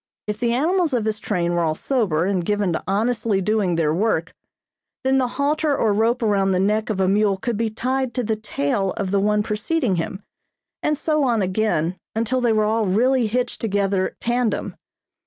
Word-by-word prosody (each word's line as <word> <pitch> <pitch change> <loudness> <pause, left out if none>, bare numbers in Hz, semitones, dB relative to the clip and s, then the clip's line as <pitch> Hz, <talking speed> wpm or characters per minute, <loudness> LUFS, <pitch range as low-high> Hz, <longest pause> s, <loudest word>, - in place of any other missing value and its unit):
If 210 0 -4
the 235 0 +1
animals 325 +5 +1
of 225 -3 0
his 215 -1 -1
train 175 -4 -1
were 175 - +1
all 160 -2 0
sober 185 - 0
and 190 -2 0
given 205 -1 0
to - - -3
honestly 220 +1 +1
doing 195 -2 +1
their 155 -2 +1
work, 175 -3 0 0.7
then 265 0 +3
the 255 - +1
halter 295 +1 +1
or 215 -2 +2
rope 230 +3 +1
around 195 -3 +2
the 180 - +1
neck 210 +3 +1
of 210 -3 -2
a 190 - +2
mule 200 0 +2
could 235 +4 -2
be 225 +1 0
tied 255 +2 -2
to 250 - 0
the 220 0 0
tail 195 -2 -1
of 195 -2 -2
the 200 - +2
one 210 +1 +2
preceding 215 - -1
him, 190 +4 -4 0.6
and 300 -1 0
so 305 0 0
on 235 -6 +2
again 185 -3 0 0.2
until 230 +3 0
they 240 -2 +2
were 215 -1 +2
all 220 0 +1
really 240 +5 +2
hitched 245 +3 -2
together 200 -3 0
tandem. 240 -2 -1
215 Hz, 195 wpm, -22 LUFS, 195-240 Hz, 0.7 s, then